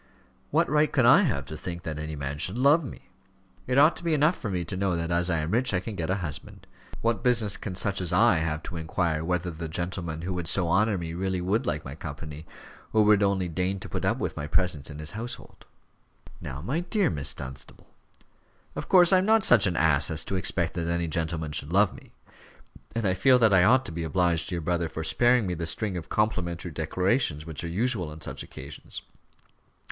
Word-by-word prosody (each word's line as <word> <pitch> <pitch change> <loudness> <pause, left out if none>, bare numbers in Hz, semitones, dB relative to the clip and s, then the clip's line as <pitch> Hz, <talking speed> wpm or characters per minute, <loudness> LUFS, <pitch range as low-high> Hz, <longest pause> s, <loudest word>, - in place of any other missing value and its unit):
What - - +2
right 150 +2 +2
can 130 -5 +3
I 135 +10 +7
have 120 - -1
to 80 - -8
think 85 +2 -6
that 80 -2 -4
any 75 0 -5
man 70 0 -5
should 95 +7 -1
love 145 +6 +4
me? 130 - -10 0.6
It 125 +1 0
ought 150 +4 +6
to - - -7
be 165 -2 +1
enough 150 +4 +3
for 105 - -5
me 90 -3 -2
to 85 - -5
know 95 -1 0
that 85 0 -3
as 85 +1 +1
I 85 -3 +1
am 75 +3 -3
rich, 120 -1 +2
I - - +2
can 105 +3 -6
get 85 -3 -3
a 95 - +2
husband. 75 -3 -8 0.4
What 115 -1 0
business 115 -5 +2
can 95 -4 -6
such 100 +1 -1
as 90 - -2
I - - +4
have 75 -1 -2
to 85 - -6
inquire 80 -1 -1
whether 90 +1 -1
the 80 0 -6
gentleman 85 -1 -4
who 90 +1 -3
would 90 -2 -4
so 90 -1 +2
honour 105 +3 +2
me 85 -2 -5
really 95 +1 -2
would 95 +5 -1
like 75 +1 -2
my 65 - -6
company, 75 +1 -8 0.4
or 110 -1 +4
would 105 -1 +5
only 100 -2 +1
deign 90 +3 -2
to - - -6
put - - -4
up - - +1
with - - -3
my 75 - -5
presence 80 -3 0
in 70 - -8
his 75 +1 -6
household?" 120 +3 -8 0.8
"Now, 70 +3 -7
my 135 - -1
dear 180 - 0
Miss 75 -4 0
Dunstable 65 +1 -10 0.4
" - - -36
"Of - - -6
course 180 -1 +6
I 185 - +6
am 185 - 0
not 220 -1 +4
such 115 -5 +6
an 90 - -1
ass 75 -2 +3
as 80 -2 0
to 95 - -3
expect 90 -2 0
that 85 -2 -3
any 85 0 -1
gentleman 80 -1 -2
should 75 +1 -2
love 100 +2 +3
me; - - -15 0.8
and 115 -2 -1
I 95 - +2
feel 130 +7 +4
that 110 -4 +4
I 90 -1 +6
ought 130 +3 +4
to - - -6
be 85 +1 -5
obliged 85 0 +1
to 90 - -2
your 85 - -4
brother 85 0 -1
for 80 - -5
sparing 120 +7 +3
me 90 - -2
the 85 -1 -3
string 95 +4 +1
of 85 -3 -6
complimentary 90 -5 -1
declarations 80 - 0
which 80 -1 -6
are - - -3
usual 100 -2 -1
on 75 +1 -10
such - - -6
occasions. 70 +3 -9
90 Hz, 235 wpm, -27 LUFS, 80-110 Hz, 0.8 s, I